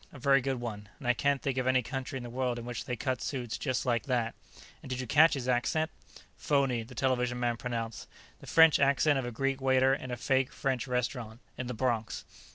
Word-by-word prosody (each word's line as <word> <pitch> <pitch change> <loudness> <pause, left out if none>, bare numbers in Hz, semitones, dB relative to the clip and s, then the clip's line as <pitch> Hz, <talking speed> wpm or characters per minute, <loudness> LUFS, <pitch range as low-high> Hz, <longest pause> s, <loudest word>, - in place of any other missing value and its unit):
"A - - -11
very 135 +1 +4
good 135 -1 -2
one. 105 -4 -6
And 125 - -7
I 125 - +5
can't 140 +2 0
think 135 -3 0
of 130 - -1
any 130 -1 +3
country 135 +2 -4
in 125 - -6
the 120 - -7
world 125 -1 -1
in 120 - -6
which 120 -1 -5
they 125 - -2
cut 130 0 -2
suits 125 -5 -3
just 130 -2 -2
like 120 -2 0
that. 120 -3 0 0.5
And - - -10
did 130 0 -3
you 130 - -3
catch 155 +6 +5
his 130 -2 -4
accent?" 130 +6 +1 0.5
"Phony," 135 -3 +1
the 120 +3 -11
television 125 -1 0
man 120 -1 +1
pronounced. 115 -2 -4 0.3
"The - - -13
French 160 -1 +6
accent 140 +1 +3
of 130 - -3
a - - -4
Greek 135 +3 -1
waiter 130 0 +4
in 130 -1 -4
a 125 - -3
fake 130 +1 +1
French 135 -2 -1
restaurant. 125 -2 -2 0.2
In 130 - -5
the 125 - -4
Bronx." 115 -2 -1
130 Hz, 230 wpm, -30 LUFS, 120-135 Hz, 0.5 s, French